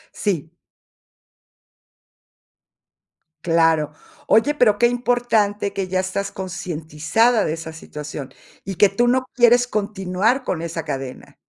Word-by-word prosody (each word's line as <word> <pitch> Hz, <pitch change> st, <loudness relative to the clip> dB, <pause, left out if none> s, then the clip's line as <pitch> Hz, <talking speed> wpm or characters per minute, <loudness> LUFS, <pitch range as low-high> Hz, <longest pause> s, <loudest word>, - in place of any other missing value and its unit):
Sí. 170 Hz, -5 st, -2 dB, 2.9 s
Claro. 165 Hz, -3 st, +3 dB, 0.3 s
Oye, 285 Hz, +7 st, +3 dB
pero 215 Hz, -7 st, +3 dB
qué 240 Hz, -, +5 dB
importante 240 Hz, -5 st, 0 dB
que 195 Hz, -2 st, -3 dB
ya 185 Hz, 0 st, 0 dB
estás 190 Hz, +1 st, -2 dB
concientizada 180 Hz, +4 st, 0 dB
de 155 Hz, -, -1 dB
esa 160 Hz, 0 st, -7 dB
situación, 150 Hz, -3 st, -8 dB, 0.3 s
y 195 Hz, -, -5 dB
que 205 Hz, +3 st, +5 dB
tú 240 Hz, +5 st, +1 dB
no 255 Hz, +1 st, +1 dB
quieres 245 Hz, 0 st, +5 dB
continuar 210 Hz, +3 st, 0 dB
con 165 Hz, -8 st, -3 dB
esa 165 Hz, -1 st, -4 dB
cadena. 135 Hz, -1 st, -6 dB
195 Hz, 115 wpm, -21 LUFS, 165-230 Hz, 2.9 s, qué